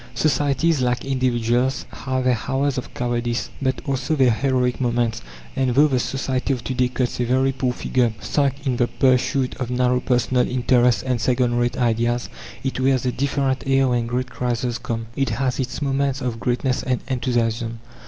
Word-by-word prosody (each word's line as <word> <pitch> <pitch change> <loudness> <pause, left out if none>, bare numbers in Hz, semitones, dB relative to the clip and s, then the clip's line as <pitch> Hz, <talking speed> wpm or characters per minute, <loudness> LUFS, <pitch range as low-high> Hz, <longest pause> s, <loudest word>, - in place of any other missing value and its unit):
Societies, 145 0 +2
like 125 -1 0
individuals, 125 -1 0
have 130 -1 -3
their 125 -3 +2
hours 135 +1 0
of - - -9
cowardice, 120 0 -2
but 130 -1 0
also 135 +2 -1
their 130 -4 +4
heroic 125 +1 0
moments; 120 - 0 0.3
and 130 -2 +1
though 145 +2 +6
the 130 -3 +1
society 130 +1 -1
of 125 -4 -5
to 130 - -3
day 125 0 +2
cuts 125 -1 -2
a - - +2
very 130 +2 +2
poor 130 -1 -1
figure 125 -1 0
sunk 140 +1 -1
in 130 -3 0
the 120 - +2
pursuit 130 +1 +1
of 125 -2 -3
narrow 125 0 +2
personal 125 0 +1
interests 125 -1 +3
and 125 -3 -1
second 125 0 +2
rate 120 0 0
ideas, 120 0 0 0.3
it 135 -1 -2
wears 130 -1 +2
a 125 - +1
different 135 0 0
air 135 -1 +3
when 120 -1 0
great 125 +1 -2
crises 120 -1 -2
come. 115 -1 -4
It 135 -1 0
has 130 +3 -1
its 130 +3 -3
moments 135 0 0
of 125 -3 -3
greatness 125 +3 0
and 125 -1 -1
enthusiasm. 120 -3 -1
125 Hz, 180 wpm, -22 LUFS, 120-135 Hz, 0.3 s, though